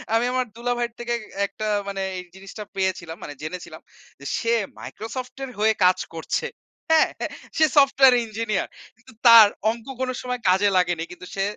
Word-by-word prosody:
আমি 230 - +3
আমার 255 -1 +1
দুলাভাইয়ের 240 -1 -2
থেকে 240 0 -2 0.3
একটা 215 +2 -5 0.2
মানে 195 -1 -3 0.2
এই 180 - -7
জিনিসটা 195 +2 -9
পেয়েছিলাম, 185 -3 -2
মানে 145 - -7
জেনেছিলাম 165 -1 -7 0.4
যে, 140 - -12
সে 230 0 0 0.3
মাইক্রোসফট 245 +3 -7
এর 265 - -5
হয়ে 220 +1 +4
কাজ 185 0 +4 0.2
করছে। 160 - -2 0.4
হ্যাঁ? 320 - +5 0.5
সে 315 - +6
সফটওয়্যার 270 -2 +6
ইঞ্জিনিয়ার, 215 -2 -2 0.3
কিন্তু 250 +3 -19
তার 230 -2 +10 0.2
অঙ্ক 230 -1 -9 0.2
কোনো 255 0 -1
সময় 250 0 -3
কাজে 190 +2 +4
লাগেনি, 175 -2 +1
কিন্তু 180 +1 -10
সে 195 - 0
220 Hz, 160 wpm, -23 LUFS, 185-245 Hz, 0.5 s, তার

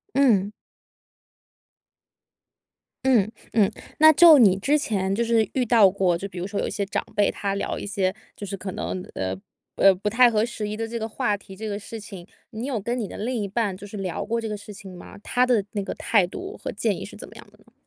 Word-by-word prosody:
嗯。 215 -8 +3 2.5
嗯， 230 -6 +3 0.2
嗯， 210 -4 +4 0.3
那 315 0 +8
就 330 0 +8
你 195 -6 +5
之 280 +9 +2
前 195 -9 -1
就 235 +3 0
是 225 -3 +2
遇 260 - +1
到 220 -5 +5
过， 185 -3 +1
就 200 +3 -5
比 180 - -9
如 175 - -3
说 200 0 -3
有 - - -2
一 - - -4
些 200 - -2
长 200 - -2
辈， 205 - +3
他 200 -1 -3
聊 200 - -3
一 - - -6
些 195 -2 -1 0.2
就 205 - -7
是 195 0 -5
可 190 0 -6
能， 185 - -4
呃， 95 0 -2 0.4
呃， 195 -1 +6
不 205 +3 -3
太 240 +2 +6
合 215 -1 +2
时 225 -3 -4
宜 210 - -4
的 225 +1 -3
这 235 +1 -5
个 220 0 -4
话 210 -1 -1
题， 195 -1 -10
这 220 - -6
个 205 -1 -3
事 225 +2 -8
情， 195 -4 -10 0.2
你 230 +1 -5
有 265 -5 -2
跟 235 +5 -3
你 210 - -3
的 - - -9
另 245 +4 -3
一 200 - -3
半 205 -1 -1
就 195 +2 -10
是 205 - -9
聊 190 -3 -3
过 230 +2 -2
这 230 - -3
个 - - -2
事 205 +1 -11
情 190 -2 -11
吗？ - - -12
他 250 +3 +1
的 235 -5 +2
那 205 - -2
个 - - -5
态 200 -5 +2
度 385 - -8
和 - - -3
建 - - 0
议 - - -7
是 - - -12
怎 - - -9
么 - - -15
样 - - -12
的 - - -23
呢？ - - -26
210 Hz, 260 characters per minute, -24 LUFS, 195-235 Hz, 2.5 s, 那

